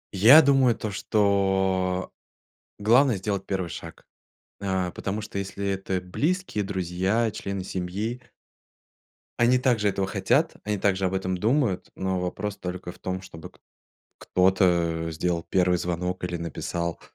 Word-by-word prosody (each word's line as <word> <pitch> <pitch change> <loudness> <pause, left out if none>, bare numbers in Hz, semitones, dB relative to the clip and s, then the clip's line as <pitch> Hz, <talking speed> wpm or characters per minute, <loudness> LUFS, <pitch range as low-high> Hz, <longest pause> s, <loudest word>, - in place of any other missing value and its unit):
Я 130 +11 +9
думаю 135 -4 +4
то, 105 -1 -4
что 95 -2 +1 0.7
главное 120 +4 +4
сделать 95 0 -3
1 95 -3 -2
шаг, - - -9 0.6
а, 95 -2 -1
потому 100 +4 -4
что, 105 -2 -6
если 100 0 -4
это 95 -1 -1
близкие, 140 - -1
друзья, 95 +4 0
члены 100 -2 -5
семьи 100 +7 -3 1.2
они 120 +1 +4
также 120 -5 +2
этого 95 -1 -1
хотят, - - +1
они 105 0 -1
также 95 -1 +1
об 95 - -1
этом 95 -1 -1
думают, 110 -1 +1
но 95 -1 -1
вопрос 100 +3 -3
только 90 -1 -6
в - - -18
том, 95 0 -4
чтобы 85 -4 -10
к - - -25 0.6
кто-то, 90 -3 +2
э, - - -3
сделал 85 +2 -1
1 90 -1 +2
звонок 90 +1 -3
или 90 -1 -2
написал. 85 0 -4
95 Hz, 140 wpm, -25 LUFS, 90-105 Hz, 1.2 s, Я